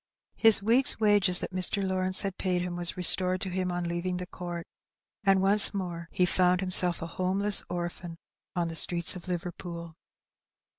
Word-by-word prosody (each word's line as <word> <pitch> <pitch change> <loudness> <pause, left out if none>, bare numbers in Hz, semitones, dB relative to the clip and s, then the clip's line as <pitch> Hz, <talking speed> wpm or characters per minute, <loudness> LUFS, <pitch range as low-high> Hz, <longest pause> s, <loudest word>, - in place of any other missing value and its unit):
His 225 -3 +3
week's 240 +4 +2
wages 205 -4 +3
that - - -5
Mr. 190 +2 -1
Lawrence 185 0 -2
had 195 -2 -5
paid 180 -2 -1
him 180 -1 -5
was 175 0 -2
restored 185 +1 +2
to 190 - -3
him 185 0 -3
on 175 0 -3
leaving 175 +1 -3
the 180 - -6
court, 175 -1 -8 0.6
and 195 -1 +2
once 200 +1 +6
more 170 -3 -6
he 180 - +1
found 180 0 +1
himself 180 -2 +2
a 165 - -10
homeless 195 +2 +2
orphan 175 -1 -6 0.4
on 175 -1 -1
the 165 - -8
streets 170 +2 +3
of 180 0 -10
Liverpool. 170 -1 -7
180 Hz, 170 wpm, -27 LUFS, 175-190 Hz, 0.6 s, once